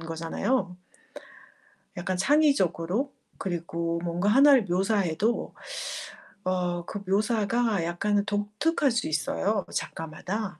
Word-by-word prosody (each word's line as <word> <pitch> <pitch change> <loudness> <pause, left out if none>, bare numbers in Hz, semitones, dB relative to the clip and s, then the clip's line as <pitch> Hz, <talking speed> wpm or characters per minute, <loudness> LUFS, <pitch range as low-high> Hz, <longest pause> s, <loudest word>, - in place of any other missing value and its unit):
거잖아요. 165 +5 -2 1.2
약간 185 0 -2
창의적으로 260 - +2 0.3
그리고 170 -2 -2
뭔가 175 +3 -1
하나를 270 +1 +7
묘사해도 195 +3 0 0.9
어 180 -2 -1
그 205 - -5
묘사가 215 0 +1
약간은 200 +4 0
독특할 210 +9 0
수 240 +1 0
있어요 185 +6 0
그 - - -14
작가마다. 180 +4 -4
195 Hz, 245 characters per minute, -27 LUFS, 175-225 Hz, 1.2 s, 하나를